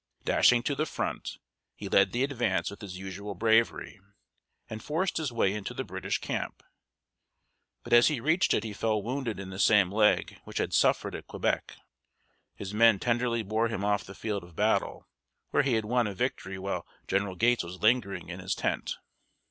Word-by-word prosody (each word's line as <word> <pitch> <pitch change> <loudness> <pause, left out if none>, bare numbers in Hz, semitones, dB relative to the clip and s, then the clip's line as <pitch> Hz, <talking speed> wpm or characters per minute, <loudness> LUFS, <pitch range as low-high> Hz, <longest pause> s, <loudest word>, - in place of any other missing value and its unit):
Dashing 120 -1 +4
to 140 - 0
the 155 +3 -1
front, - - -4 0.4
he - - -7
led - - +4
the 120 +2 0
advance 135 -7 0
with 100 - -11
his 95 -3 -7
usual 95 +2 -6
bravery, 110 +1 +1 0.7
and 110 0 -7
forced 170 +5 -1
his 155 -5 -2
way 110 -5 +1
into 105 -2 -5
the - - -2
British - - -3
camp. - - -4 1.2
But - - -3
as 120 0 +7
he 150 -5 0
reached 160 +9 +2
it 105 - 0
he 110 -2 -5
fell 110 0 0
wounded 120 -3 -3
in 95 -1 -7
the 95 - -7
same 100 -4 +5
leg 105 +1 +2
which - - -8
had - - -1
suffered - - +2
at - - -7
Quebec. - - -2 0.8
His 100 0 -7
men 115 -1 +5
tenderly 120 +1 0
bore 110 +3 0
him 105 -3 -3
off 105 0 +1
the 100 - -11
field 105 -3 -3
of 85 -2 -15
battle, - - 0 0.4
where - - +4
he 135 -3 0
had 110 -2 +1
won 120 +1 +1
a 100 - -5
victory 95 -5 -3
while 95 +1 -4 0.2
General 95 -1 0
Gates 120 +3 +2
was 90 +3 -9
lingering 105 -7 +2
in 90 +1 -6
his 95 +1 -2
tent. - - -2
110 Hz, 190 wpm, -29 LUFS, 100-120 Hz, 1.2 s, as